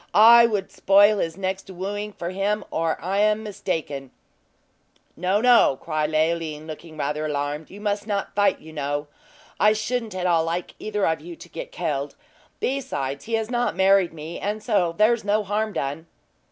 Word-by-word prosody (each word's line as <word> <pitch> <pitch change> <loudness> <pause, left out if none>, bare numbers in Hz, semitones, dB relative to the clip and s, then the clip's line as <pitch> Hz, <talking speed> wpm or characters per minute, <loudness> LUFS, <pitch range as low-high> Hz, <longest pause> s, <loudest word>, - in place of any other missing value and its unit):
I 235 +2 +9
would 205 -4 -2
spoil 205 +2 +5
his 165 0 -2
next 190 0 -3
wooing 205 +3 -4
for 175 -3 -5
him, 200 +3 -1
or 165 0 -1
I 190 +4 -1
am 215 +1 +2
mistaken!" 160 -9 -4 1.1
"No, 185 +4 +1
no!" 240 - +5
said 155 -2 0
Leoline, 155 -1 0
looking 155 0 -9
rather 150 +1 -2
alarmed; 145 +1 -3
"you 200 - -11
must 205 0 -2
not 200 -2 -2
fight, 205 0 +2
you 160 0 -13
know. 145 0 -2 0.5
I 210 +1 +5
shouldn't 220 -1 -3
at 185 -1 -2
all 170 -2 +3
like 170 +2 -3
either 210 -2 -1
of 160 -2 0
you 170 +2 -9
to - - -13
get - - -7
killed. 145 - -3 0.4
Besides, 140 - -3
he 230 - -6
has 225 +1 -2
not 240 -5 0
married 190 -1 +4
me; 160 +1 -7
and 210 +1 -3
so 185 -8 +1
there's 220 +2 +3
no 210 +1 +1
harm 210 +2 -1
done." 150 -1 -4
190 Hz, 175 wpm, -24 LUFS, 160-210 Hz, 1.1 s, I